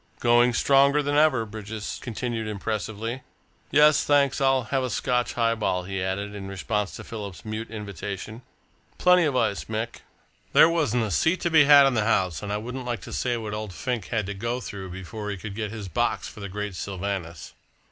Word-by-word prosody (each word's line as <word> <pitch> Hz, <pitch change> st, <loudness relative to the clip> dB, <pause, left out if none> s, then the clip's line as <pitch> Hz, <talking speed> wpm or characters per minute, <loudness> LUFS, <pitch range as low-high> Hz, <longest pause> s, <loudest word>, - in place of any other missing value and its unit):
"Going 120 Hz, 0 st, +4 dB
stronger 140 Hz, +3 st, +4 dB
than 145 Hz, 0 st, 0 dB
ever," 145 Hz, -6 st, +4 dB
Bridges 110 Hz, 0 st, -6 dB
continued 115 Hz, -1 st, -3 dB
impressively. 110 Hz, +3 st, -3 dB, 0.5 s
"Yes, 150 Hz, 0 st, +5 dB
thanks, 140 Hz, -2 st, +2 dB
I'll 135 Hz, -1 st, +3 dB
take -, -, -15 dB
a 130 Hz, -, -2 dB
Scotch 125 Hz, +2 st, 0 dB
highball," 115 Hz, -6 st, 0 dB
he 95 Hz, +1 st, -4 dB
added, 100 Hz, +2 st, -3 dB
in 100 Hz, -1 st, -7 dB
response 100 Hz, +2 st, -2 dB
to -, -, -8 dB
Philip's 100 Hz, -5 st, -8 dB
mute 110 Hz, +1 st, -5 dB
invitation, 105 Hz, +1 st, -6 dB, 0.6 s
"plenty 180 Hz, -1 st, +5 dB
of 145 Hz, -3 st, 0 dB
ice, 100 Hz, -5 st, 0 dB
Mick. 110 Hz, +1 st, -4 dB, 0.6 s
There -, -, +8 dB
wasn't 145 Hz, -9 st, +1 dB
a 105 Hz, -, -2 dB
seat 160 Hz, -, +2 dB
to 170 Hz, -, 0 dB
be 155 Hz, -3 st, +7 dB
had 140 Hz, -1 st, +8 dB
in 135 Hz, -, +3 dB
the 110 Hz, -3 st, +1 dB
house, 95 Hz, -6 st, +1 dB
and 105 Hz, -1 st, -5 dB
I 105 Hz, -, 0 dB
wouldn't 125 Hz, +4 st, -6 dB
like 120 Hz, -2 st, -2 dB
to -, -, -9 dB
say 120 Hz, -1 st, 0 dB
what 110 Hz, -2 st, -5 dB
old 105 Hz, -3 st, -5 dB
Fink 120 Hz, -3 st, -3 dB
had 110 Hz, -4 st, -1 dB
to 100 Hz, -, -4 dB
go 115 Hz, +5 st, -3 dB
through 100 Hz, -4 st, -7 dB
before 100 Hz, +4 st, -6 dB
he 100 Hz, -, -3 dB
could 100 Hz, +2 st, -7 dB
get 105 Hz, 0 st, -3 dB
his 105 Hz, -2 st, -7 dB
box -, -, -1 dB
for -, -, -11 dB
the 100 Hz, -1 st, -6 dB
great 105 Hz, +1 st, -4 dB
Sylvanus." 90 Hz, -4 st, -5 dB
110 Hz, 200 wpm, -25 LUFS, 100-125 Hz, 0.6 s, There